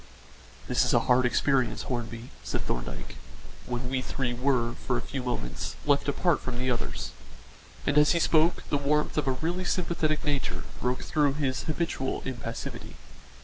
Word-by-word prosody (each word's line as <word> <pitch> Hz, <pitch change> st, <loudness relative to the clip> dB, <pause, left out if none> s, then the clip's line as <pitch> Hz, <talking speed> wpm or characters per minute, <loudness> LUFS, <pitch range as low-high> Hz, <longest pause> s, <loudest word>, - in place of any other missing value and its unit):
"This -, -, +3 dB
is -, -, +3 dB
a -, -, +5 dB
hard 125 Hz, 0 st, +4 dB
experience, 130 Hz, +1 st, +2 dB
Hornby," 120 Hz, -1 st, -4 dB
said -, -, -2 dB
Thorndyke, -, -, -4 dB, 0.5 s
when 125 Hz, 0 st, -2 dB
we 130 Hz, 0 st, 0 dB
three 130 Hz, -1 st, -2 dB
were, 120 Hz, -2 st, +1 dB
for 125 Hz, 0 st, -1 dB
a -, -, -2 dB
few 135 Hz, -, -4 dB
moments, 120 Hz, -, -3 dB
left 145 Hz, -1 st, +3 dB
apart 155 Hz, +2 st, +2 dB
from 130 Hz, -2 st, -4 dB
the 130 Hz, +1 st, +1 dB
others; 120 Hz, -, -3 dB, 0.7 s
and 145 Hz, +1 st, +4 dB
as 150 Hz, +3 st, +6 dB
he 170 Hz, -, +2 dB
spoke 165 Hz, +1 st, +3 dB
the 145 Hz, -, +2 dB
warmth 150 Hz, +2 st, +1 dB
of 145 Hz, -, -2 dB
a -, -, +4 dB
really 170 Hz, +7 st, -1 dB
sympathetic 165 Hz, -4 st, 0 dB
nature 145 Hz, -2 st, -1 dB, 0.2 s
broke 125 Hz, +1 st, 0 dB
through 145 Hz, -3 st, +2 dB
his 140 Hz, -3 st, -1 dB
habitual 155 Hz, -4 st, -1 dB
impassivity. 115 Hz, -3 st, -5 dB
135 Hz, 165 wpm, -28 LUFS, 125-150 Hz, 0.7 s, as